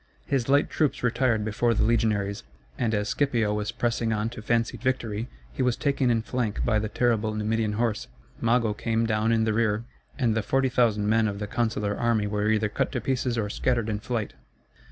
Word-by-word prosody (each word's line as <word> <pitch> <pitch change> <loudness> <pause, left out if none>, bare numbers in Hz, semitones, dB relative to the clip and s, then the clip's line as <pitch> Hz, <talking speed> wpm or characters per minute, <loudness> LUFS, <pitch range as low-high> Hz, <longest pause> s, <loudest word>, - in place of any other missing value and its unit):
His 135 -2 -1
light 140 +2 +4
troops 150 -5 0
retired 120 -3 +1
before 115 +2 +1
the - - +2
legionaries, 105 -3 +1 0.3
and 110 -2 0
as 105 0 -1
Scipio 120 -7 +1
was 105 +1 -2
pressing 120 -1 -1
on 110 +1 -1
to 120 - -8
fancied 115 +1 0
victory 120 -3 -1 0.2
he - - -3
was 125 -2 +1
taken 140 -3 +1
in 115 -2 +2
flank 115 -4 -2
by 110 -3 +2
the 110 0 -3
terrible 110 -2 +1
Numidian 110 0 0
horse, 110 -1 -1 0.3
Mago 115 -2 +2
came 115 +1 0
down 110 0 +1
in 115 -1 +3
the 110 -1 +1
rear, 110 0 +1 0.3
and 120 -5 +2
the 110 - +1
40,000 120 -3 +1
men 110 +1 +3
of 100 -1 -3
the 105 - -3
consular 105 -2 -1
army 115 -2 +1
were 105 +1 0
either 110 0 +2
cut 105 - -1
to 125 - 0
pieces 125 0 -1
or 110 -2 0
scattered 120 +1 0
in 105 -1 -1
flight. 110 -1 -3
115 Hz, 195 wpm, -26 LUFS, 105-120 Hz, 0.3 s, light